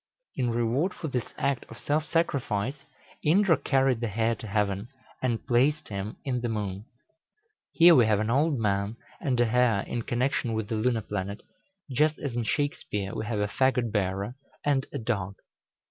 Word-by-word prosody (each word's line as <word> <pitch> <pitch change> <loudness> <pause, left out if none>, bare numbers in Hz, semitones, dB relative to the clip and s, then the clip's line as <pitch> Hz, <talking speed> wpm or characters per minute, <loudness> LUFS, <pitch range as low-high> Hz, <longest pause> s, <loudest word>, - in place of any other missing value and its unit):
In 125 -2 0
reward 120 +10 0
for 160 - -5
this 125 -3 -3
act 140 -2 0
of - - -10
self 150 +1 0
sacrifice, 140 -5 -1 0.4
Indra 175 +2 +5
carried 135 -3 +2
the 120 - -1
hare 110 +2 +1
to 110 - -8
heaven, 100 0 0 0.3
and 120 -3 -1
placed 140 +5 +2
him 100 +1 -4
in 125 -3 -1
the 120 - -1
moon. 105 -2 -3 0.9
Here 170 +1 +7
we 120 -7 +6
have 105 -2 +3
an 110 +2 0
old 145 +3 +2
man 100 0 0 0.2
and 130 -7 0
a 120 - +5
hare 115 -3 +3
in 120 +3 -3
connection 120 0 0
with 110 -2 -2
the 115 - -1
lunar 115 +1 +1
planet, 100 0 -4 0.5
just 150 +4 +2
as 135 -5 -4
in 120 -2 -1
Shakspeare 105 -6 -2
we 110 - -4
have 110 -3 -1
a 105 - +1
fagot 125 +1 +1
bearer 100 +1 -1 0.3
and 140 -2 +2
a - - -3
dog. 100 -6 -2
120 Hz, 175 wpm, -28 LUFS, 105-135 Hz, 0.9 s, Here